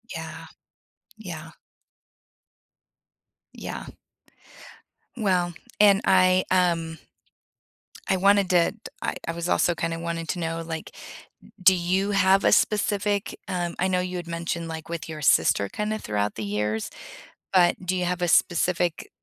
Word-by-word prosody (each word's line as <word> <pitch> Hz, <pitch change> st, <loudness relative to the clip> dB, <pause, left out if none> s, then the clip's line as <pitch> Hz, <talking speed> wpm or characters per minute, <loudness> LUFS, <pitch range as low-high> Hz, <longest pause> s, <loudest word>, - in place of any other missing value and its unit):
Yeah. -, -, -7 dB, 0.7 s
Yeah. 165 Hz, -6 st, -8 dB, 2.0 s
Yeah. -, -, -7 dB, 1.3 s
Well 185 Hz, -6 st, 0 dB, 0.3 s
and 205 Hz, -1 st, +6 dB
I, 185 Hz, 0 st, +4 dB
um 170 Hz, -3 st, +1 dB, 1.1 s
I 190 Hz, -, +3 dB
wanted 200 Hz, 0 st, +4 dB
to 175 Hz, -2 st, +4 dB
t 220 Hz, -, -19 dB, 0.2 s
I -, -, -2 dB
I -, -, 0 dB
was 170 Hz, +1 st, -4 dB
also 175 Hz, -, +2 dB
kinda 165 Hz, 0 st, -3 dB
wanting 165 Hz, 0 st, -4 dB
to 175 Hz, -, -2 dB
know, 165 Hz, 0 st, -3 dB
like, 160 Hz, -1 st, -6 dB, 0.7 s
do 190 Hz, +1 st, +7 dB
you 185 Hz, +3 st, 0 dB
have 195 Hz, 0 st, +4 dB
a -, -, +4 dB
specific, 205 Hz, -1 st, +1 dB
um 175 Hz, -2 st, -2 dB
I 185 Hz, -, +2 dB
know 180 Hz, -1 st, +1 dB
you 180 Hz, 0 st, -3 dB
had 175 Hz, -1 st, -6 dB
mentioned, 170 Hz, 0 st, -3 dB
like, 160 Hz, -1 st, -7 dB
with 170 Hz, -1 st, -5 dB
your 155 Hz, -1 st, -6 dB
sister 100 Hz, -7 st, +3 dB
kinda 215 Hz, -, -3 dB
throughout 105 Hz, -1 st, -2 dB
the 110 Hz, -, -5 dB
years, 105 Hz, +2 st, -2 dB, 0.6 s
but 180 Hz, 0 st, +3 dB
do 185 Hz, -, 0 dB
you 180 Hz, -1 st, -1 dB
have 180 Hz, 0 st, -2 dB
a 175 Hz, -, +1 dB
specific 175 Hz, -1 st, +1 dB
175 Hz, 140 wpm, -25 LUFS, 165-190 Hz, 2.0 s, do